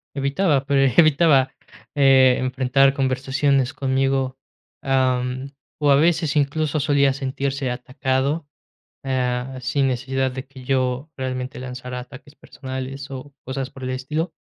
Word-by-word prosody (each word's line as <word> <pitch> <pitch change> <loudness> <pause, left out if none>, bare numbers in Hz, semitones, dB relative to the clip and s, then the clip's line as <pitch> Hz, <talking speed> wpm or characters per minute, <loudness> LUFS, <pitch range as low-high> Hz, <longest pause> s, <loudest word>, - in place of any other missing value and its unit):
Evitaba, 140 +1 +1
pero 135 -3 +3
evitaba, 155 -4 +5 0.4
eh, 130 -2 +5
enfrentar 130 +1 +2
conversaciones 135 0 +1
conmigo, 135 -1 0 0.5
am, 130 0 0 0.3
o 145 -1 +3
a 140 - +6
veces, 160 0 +2
incluso, 150 +1 +1
solía 140 -1 +3
sentirse 135 0 -2
atacado, 130 +4 -1 0.6
ah, 130 0 -1
sin 135 +1 +1
necesidad 130 +1 -1
de 130 +1 -6
que 130 -1 -13
yo 130 +2 -1
realmente 130 0 -4
lanzara 125 0 -6
ataques 130 +3 -13
personales 135 +1 -7
o 135 +1 -8
cosas 130 0 -4
por 135 - -10
el 130 - -3
estilo. 150 +6 -3
135 Hz, 125 wpm, -22 LUFS, 130-140 Hz, 0.6 s, a